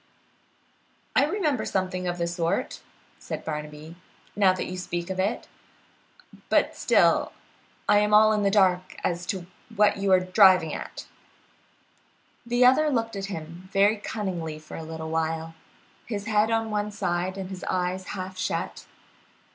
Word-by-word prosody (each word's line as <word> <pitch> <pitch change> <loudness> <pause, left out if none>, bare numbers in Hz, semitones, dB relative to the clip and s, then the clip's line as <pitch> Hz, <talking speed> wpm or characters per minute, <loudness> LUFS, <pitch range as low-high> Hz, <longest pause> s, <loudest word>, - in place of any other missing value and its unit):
"I - - +5
remember 315 -10 0
something 185 -1 -2
of 175 0 -2
the 170 - 0
sort," 170 -1 -2 0.4
said - - -6
Barnaby, 150 +1 -6 0.4
"now 195 -2 +5
that 185 - -3
you 185 - -5
speak 175 0 -4
of 190 - -4
it, 200 +5 -1 1.0
but - - +2
still - - +3 0.5
I 205 - +5
am 210 0 +1
all 215 +1 +6
in 210 - +1
the 200 - +3
dark 185 -3 +2
as 175 0 -2
to 185 -2 -3 0.3
what 205 0 +4
you 195 -1 0
are 185 - +7
driving 185 -3 +5
at." - - -7 1.4
The 240 +1 +3
other 280 +5 +5
looked 230 -5 -1
at 195 0 -3
him 175 -1 -8
very 205 +2 +4
cunningly 185 -7 -4
for 155 0 -11
a - - -6
little 160 0 -6
while, 160 0 -2 0.5
his 205 -3 -4
head 215 0 +2
on 225 -1 0
one 210 0 -1
side, 185 -2 -2
and 190 -1 -6
his 185 -2 -7
eyes 185 +1 -2
half 185 -1 -6
shut. - - -3
185 Hz, 155 wpm, -26 LUFS, 175-210 Hz, 1.4 s, are